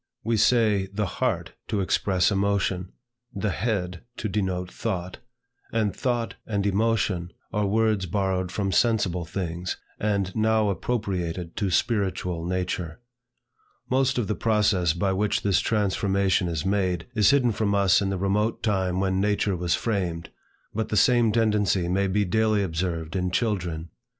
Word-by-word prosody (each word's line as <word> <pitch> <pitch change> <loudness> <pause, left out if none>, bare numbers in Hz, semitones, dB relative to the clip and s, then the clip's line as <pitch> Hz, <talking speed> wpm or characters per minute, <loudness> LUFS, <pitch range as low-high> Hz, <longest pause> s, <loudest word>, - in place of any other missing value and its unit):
We 115 +1 +1
say 110 -3 +3
the 105 +1 -1
heart 90 - -2
to 105 - -1
express 95 0 +2
emotion, 95 -2 0 0.4
the 100 +1 -1
head 90 -7 -2 0.2
to 110 - -2
denote 95 -3 -2
thought; 95 -5 -4 0.5
and 110 -3 0
thought 120 -3 -1
and 100 -2 -1
emotion 100 -4 0 0.2
are 105 -1 +1
words 110 -2 +1
borrowed 95 -1 -1
from 95 0 -1
sensible 95 -5 +1
things, 90 0 -4 0.2
and 100 -3 -1
now 110 -1 +2
appropriated 90 -5 -2
to 100 -3 0
spiritual 90 -3 0
nature. 90 -1 -3 0.9
Most 130 0 +2
of 120 -5 0
the 105 - 0
process 105 -7 +2
by 95 +3 0
which 105 +2 0
this 100 -2 +3
transformation 100 -3 +1
is 85 0 -2
made, 95 -3 0
is 105 -3 +4
hidden 135 -4 +4
from 105 -1 0
us 100 -1 +4
in 100 - 0
the 95 - -1
remote 100 +4 0
time 95 -4 0
when 95 0 +1
language 105 0 +1
was 90 -2 0
framed; 90 -7 -2 0.4
but 110 0 -2
the 105 - 0
same 120 0 +4
tendency 105 -5 +2
may 95 +2 +1
be 100 +2 +1
daily 110 +1 +2
observed 85 -1 -3
in 90 -1 0
children. 90 -6 -1
100 Hz, 150 wpm, -25 LUFS, 90-105 Hz, 0.9 s, is